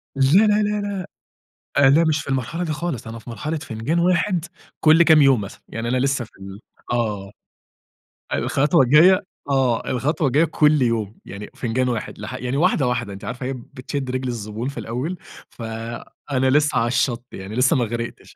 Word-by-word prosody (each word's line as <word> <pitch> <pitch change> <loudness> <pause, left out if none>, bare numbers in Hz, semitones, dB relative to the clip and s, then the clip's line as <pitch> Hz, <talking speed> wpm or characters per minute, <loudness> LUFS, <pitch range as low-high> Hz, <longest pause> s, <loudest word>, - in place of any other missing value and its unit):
لا، 135 - -2 0.3
لا، 210 0 +3
لا، 210 0 -1
لأ، 200 -2 -3 0.8
أنا 140 +4 +6
مش 155 -1 +1
في - - -11
المرحلة 135 +7 -2
دي 155 - -2
خالص، 150 -6 -4
أنا 115 0 -7
في 115 - -11
مرحلة 150 +8 -3
فنجان 130 +4 -2
1 180 0 +1 0.4
كلّ 160 +2 +6
كام 160 -3 +6
يوم 135 -4 +5
مثلًا، 100 +1 -8
يعني 115 +1 -4
أنا 130 - +1
لسّه 135 -1 0
في - - -18
ال 95 +2 -9 0.3
آه، 105 -5 -2 1.0
الخطوة 145 +2 +2
الجاية 175 +9 +6 0.3
آه 130 -4 +1
الخطوة 145 +6 0
الجاية 140 +5 +3
كلّ 150 -2 +3
يوم، 115 -3 -1
يعني 100 +1 -9
فنجان 125 +2 -1
1 120 -3 -4
لـح 105 +4 -7
يعني 130 +1 -3
واحدة، 155 -3 +2
واحدة 120 -4 -2
أنتِ 100 - -9
عارفة 125 +1 -5
هي 135 - -2
بتشد 130 +1 -6
رجل 130 0 -2
الزبون 115 0 -4
في 140 - -6
الأول، 130 +11 -4 0.3
فأنا 120 +4 -4
لسّه 150 0 +3
علي 115 - +2
الشط 120 -1 0
يعني، 95 +2 -7
لسّه 125 +1 +3
ما 125 - +2
غرِقتِش. 115 +1 -6
130 Hz, 180 wpm, -22 LUFS, 115-150 Hz, 1.0 s, أنا